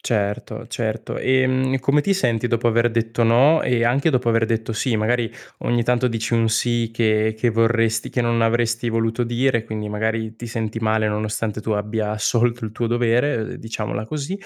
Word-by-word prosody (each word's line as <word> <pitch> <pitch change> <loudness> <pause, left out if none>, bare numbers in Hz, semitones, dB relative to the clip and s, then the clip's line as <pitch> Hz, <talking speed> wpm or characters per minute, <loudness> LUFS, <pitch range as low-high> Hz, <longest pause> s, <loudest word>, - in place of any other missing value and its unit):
Certo, 105 -3 -2
certo. 110 -1 -4
Ehm, 130 0 +1
e - - +1
come 145 +3 +2
ti 200 - +1
senti 125 - 0
dopo 120 0 +1
aver 115 +1 +2
detto 115 +1 -1
no 130 +8 +5
e 120 -2 +1
anche 140 +6 +2
dopo 125 -3 +1
aver 115 0 +3
detto 115 0 -2
sì? 120 +1 0
Magari 115 +1 0 0.3
ogni 120 -1 +1
tanto 125 +1 +1
dici 115 0 -2
un 115 -1 +2
sì 115 0 0
che 110 -1 +1
che 120 - +2
vorresti 115 0 +1
che 125 - -1
non 115 -1 +1
avresti 115 0 +1
voluto 115 +1 0
dire, 120 0 0
quindi 110 -1 -5
magari 110 +1 -2
ti 120 - -8
senti 115 -1 -3
male, 110 -1 +1
nonostante 110 0 -3
tu 110 - -4
abbia 105 +1 -1
assolto 115 +2 0
il 105 - -8
tuo 120 +1 -2
dovere, 120 +4 +1
uhm, 110 0 -4
diciamola 110 -1 -4
così. 150 +7 -4
115 Hz, 190 wpm, -21 LUFS, 110-120 Hz, 0.3 s, no